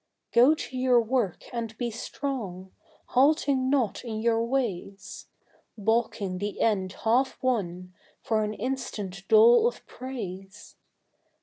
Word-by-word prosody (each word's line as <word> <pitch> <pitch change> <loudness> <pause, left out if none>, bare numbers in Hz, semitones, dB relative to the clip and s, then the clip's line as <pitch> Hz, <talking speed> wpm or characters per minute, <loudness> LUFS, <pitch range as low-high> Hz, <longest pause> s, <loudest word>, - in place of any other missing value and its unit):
Go 255 +6 +6
to 285 -4 -7
your 255 -1 +4
work 230 -5 -1
and 230 -2 -4
be 240 -2 -2
strong, 215 -6 -5 0.4
halting 275 -1 +3
not 260 -7 0
in 220 -3 -4
your 230 0 +2
ways, 230 -6 -3 0.5
Baulking 210 -3 0
the 205 +1 -4
end 190 -4 +1
half 250 +4 +2
won 180 -7 -2 0.3
for 220 -1 0
an 210 0 -3
instant 210 -8 -5
dole 460 +1 +7
of - - -5
praise. 200 -6 -8
230 Hz, 120 wpm, -27 LUFS, 200-260 Hz, 0.5 s, dole